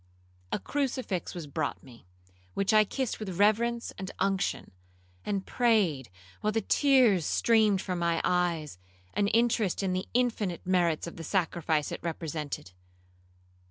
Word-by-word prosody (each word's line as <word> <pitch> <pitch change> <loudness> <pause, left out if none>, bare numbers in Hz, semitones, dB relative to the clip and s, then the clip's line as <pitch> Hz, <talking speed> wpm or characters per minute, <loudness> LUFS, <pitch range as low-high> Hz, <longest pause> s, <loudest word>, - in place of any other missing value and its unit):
A - - +1
crucifix 255 -11 -2
was 170 -3 -5
brought 145 +1 -3
me, 120 -8 -16 0.5
which 195 +2 +1
I 215 0 +6
kissed 260 +3 -3
with 190 -5 -5
reverence 230 +3 +2
and 190 0 -5
unction, 195 0 -1 0.5
and 200 -2 -2
prayed, 200 - +1 0.3
while 215 - 0
the 225 +1 0
tears 255 - +4
streamed 215 +2 +3
from 180 -2 -3
my 170 -1 +1
eyes, 170 - 0 0.3
an 200 - +1
interest 225 -3 +1
in 185 -1 0
the 185 +1 -2
infinite 225 -8 0
merits 175 -4 +1
of 170 - -8
the 165 - -7
sacrifice 165 -3 0
it - - -4
represented. 155 - -4
190 Hz, 140 wpm, -29 LUFS, 170-220 Hz, 0.5 s, I